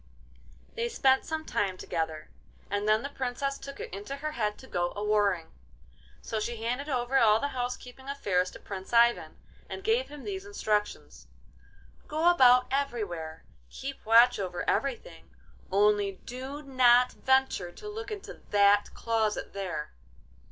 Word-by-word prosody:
They 470 0 -2
spent 265 - +3
some 315 0 -4
time 190 -2 -1
together, 160 -3 -4 0.4
and 205 +1 -1
then 215 +2 +3
the 280 - -4
Princess 275 +1 -3
took 275 0 -9
it - - -7
into 205 +8 -5
her 305 +2 -4
head 210 -7 -2
to - - -13
go 175 -6 -1
a 205 - -4
warring. 205 -5 +1 0.7
So 220 - -3
she 225 +1 -4
handed 250 +6 -2
over 255 0 +1
all 215 -1 +5
the 285 - -1
house 250 -1 -3
keeping 265 +2 -12
affairs 185 -10 0
to - - -12
Prince 190 +2 -8
Ivan, 235 0 +3 0.3
and 385 - -6
gave 455 +4 +1
him 295 -1 -10
these 385 -1 -5
instructions: 215 - -3 0.8
'Go 320 +3 +3
about 250 -6 +6
everywhere, 200 - -3 0.3
keep - - -7
watch 235 +3 +6
over 180 -3 -4
everything; 275 - -2 0.4
only 205 0 +3
do 265 +4 -7
not 250 -2 +5
venture 265 -9 +1
to 420 - -10
look 425 +1 -6
into 415 -2 -8
that 205 0 +4
closet 225 -2 -1
there. 185 -6 -4
240 Hz, 150 wpm, -29 LUFS, 205-275 Hz, 0.8 s, about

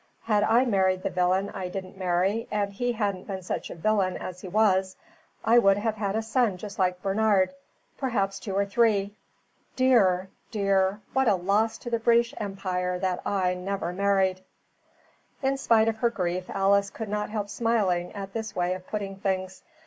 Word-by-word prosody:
Had 210 -2 +2
I 235 +4 +4
married 190 -5 +1
the - - -1
villain 185 +2 +1
I 185 - -4
didn't 185 +1 -7
marry, 190 +4 0
and 200 -1 -1
he 245 +4 -1
hadn't 200 -4 -2
been 190 -2 -5
such - - -4
a - - -7
villain 190 +1 +1
as 180 0 -7
he - - -7
was, 190 -1 +2 0.5
I 235 +2 +6
would 195 -3 +4
have 220 +1 0
had 205 -1 -2
a 225 - 0
son 225 -4 +1
just 200 +2 -9
like 180 -1 0
Bernard 200 +1 +2 0.5
perhaps 200 -7 -1
two 195 -3 -5
or 200 0 +2
three. 205 -1 +2 0.6
Dear! 195 -8 +3 0.2
dear, 195 -1 +1
what 265 -1 +2
a 210 - +5
loss 205 +5 +1
to 240 - -8
the 230 - +1
British 235 +1 +3
Empire 185 -3 -2
that 185 -1 -1
I 185 -2 +1
never 180 -1 -3
married." 190 -1 +1 1.0
In 270 +1 +2
spite 230 -5 +3
of 225 -1 0
her 235 +1 +2
grief 180 -4 -3
Alice 200 +1 +2
could 220 +1 -6
not 210 +1 -2
help 210 -1 -3
smiling 200 -6 0
at 195 -1 -7
this 220 -1 -5
way 180 0 0
of 185 0 -8
putting 200 -2 -4
things. 190 -1 -2
200 Hz, 180 wpm, -26 LUFS, 185-220 Hz, 1.0 s, I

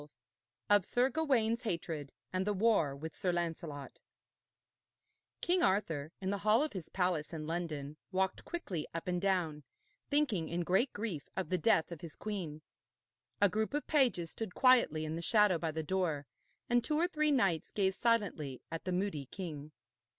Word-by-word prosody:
XII 145 - -12 0.6
OF 205 -2 +7
SIR 250 +2 +2
GAWAINE'S 240 -6 +2
HATRED, 165 - -3 0.2
AND 185 +2 0
THE 210 - +1
WAR 190 -9 +3
WITH 160 +3 -7
SIR 180 -2 0
LANCELOT 165 -4 -4 1.4
King 355 +1 +2
Arthur, 165 -7 +1
in 190 0 -2
the 200 - -1
hall 215 +6 +4
of 305 - -3
his 180 -5 -6
palace 180 -5 0
in 155 -1 -4
London, 155 -3 -3
walked 190 0 0
quickly 195 - -4
up 165 - -4
and 180 -1 0
down, 175 -6 0 0.5
thinking 255 - +1
in 175 +1 -1
great 190 +10 +2
grief 205 -9 -4
of 190 - -2
the 185 -1 +1
death 165 -4 +3
of 170 - -7
his 165 -3 -8
queen. 175 -8 -5 0.8
A 205 - +7
group 220 +7 -1
of 295 - -1
pages 245 - +2
stood 220 -5 -5
quietly 240 - +4
in 155 +1 -3
the 165 - -3
shadow 205 -1 +4
by 165 - -1
the 160 0 -3
door, 160 -4 0 0.4
and 240 0 +3
two 300 - 0
or 340 +3 +3
three 305 -3 +1
knights 195 - +2
gazed 190 -2 0
silently 195 - +1
at 165 - -5
the 185 - -1
moody 180 -7 -1
king. 155 -5 -6
185 Hz, 175 wpm, -34 LUFS, 160-220 Hz, 1.4 s, OF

